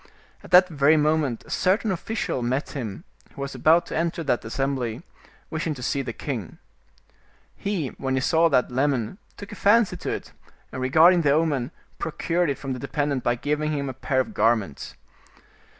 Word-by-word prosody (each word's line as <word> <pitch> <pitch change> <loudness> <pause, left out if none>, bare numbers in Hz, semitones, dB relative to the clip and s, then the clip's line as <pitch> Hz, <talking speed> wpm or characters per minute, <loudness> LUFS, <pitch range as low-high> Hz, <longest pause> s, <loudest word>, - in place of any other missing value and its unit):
At - - -12
that 180 0 +7
very 150 -2 +3
moment 150 -5 +1
a - - -12
certain 200 +3 +1
official 190 - -3
met 130 +4 -1
him, 120 -1 -5 0.3
who 140 - -7
was 140 0 -4
about 165 +2 +4
to - - -6
enter 165 0 -1
that 140 -5 0
assembly, 130 +1 -2 0.5
wishing 160 -1 -2
to 125 - -8
see 140 +3 0
the 125 -2 -4
king. 115 - -5 1.0
He, 185 -9 -2
when 135 -1 -3
he - - +2
saw 165 +4 +3
that 125 -4 +2
lemon, 135 - 0 0.2
took 200 - -9
a - - -7
fancy 220 +1 +3
to - - -5
it, - - -5 0.4
and 130 - -5
regarding 160 +7 +5
the 150 - +2
omen, 145 -5 +1 0.3
procured 170 +1 -1
it 140 - -1
from 135 -1 -4
the 125 - -6
dependent 145 -1 -2
by 120 - +2
giving 150 +4 -1
him 140 -2 -2
a - - -5
pair 130 +1 -1
of 130 - -1
garments. 110 -9 0
145 Hz, 180 wpm, -24 LUFS, 130-165 Hz, 1.0 s, that